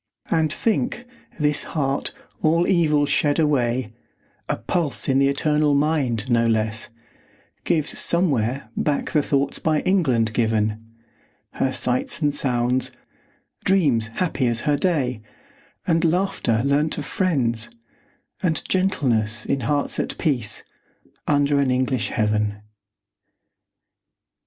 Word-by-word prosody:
And 160 -2 +2
think, 240 +5 -1 0.3
this 150 0 +2
heart, 135 -1 0 0.3
all 165 +2 +3
evil 155 -6 +3
shed 145 0 +1
away, 130 -6 +1 0.6
A - - +1
pulse 165 -6 -1
in 135 0 +3
the 135 - +4
eternal 150 +1 +2
mind, 140 -6 0
no 115 -2 +2
less 110 -1 0 0.8
Gives 155 -3 0
somewhere 135 -8 0
back 145 -2 -1
the 150 - +3
thoughts 140 -1 0
by 155 -1 +1
England 130 - +1
given; 110 -1 0 0.7
Her 135 - -1
sights 125 -1 -1
and 145 -3 +1
sounds; 125 -2 0 0.7
dreams 145 - +2
happy 160 -8 0
as 120 -1 0
her 150 - +1
day; 140 -8 0 0.6
And 165 -2 +2
laughter, 170 - +1
learnt 145 +3 +1
of - - -4
friends; 130 - 0 0.7
and 165 -5 0
gentleness, 120 - +1
In 135 - 0
hearts 145 +4 0
at - - -2
peace, 130 - 0 0.6
under 145 -1 +2
an 140 -2 +2
English 130 -1 0
heaven. 105 -2 -1
140 Hz, 120 wpm, -22 LUFS, 120-155 Hz, 0.8 s, the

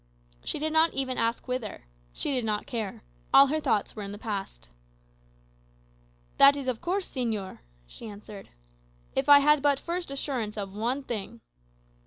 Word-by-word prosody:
She - - -2
did 310 +1 -2
not 320 +1 +4
even 260 -2 -1
ask 230 +3 -1
whither. 250 - -4 0.3
She 170 - -1
did 250 -2 +1
not 210 -1 -1
care: 220 - -5 0.3
all 275 - +9
her 305 +3 0
thoughts 210 -8 0
were 215 - -6
in 200 -1 -5
the 205 - -7
past. 200 - -5 1.7
"That 275 +1 +8
is 275 -2 -5
of 250 -3 -2
course, 370 +2 -1
señor," 220 -7 -3 0.3
she - - -11
answered. 205 -1 -10 0.7
"If 270 +2 0
I 285 0 +10
had 300 0 +4
but 285 -1 +3
first 345 -1 -4
assurance 255 -6 -3
of 195 -2 -5
one 240 +7 -1
thing." 230 -1 -5
250 Hz, 165 wpm, -28 LUFS, 210-285 Hz, 1.7 s, I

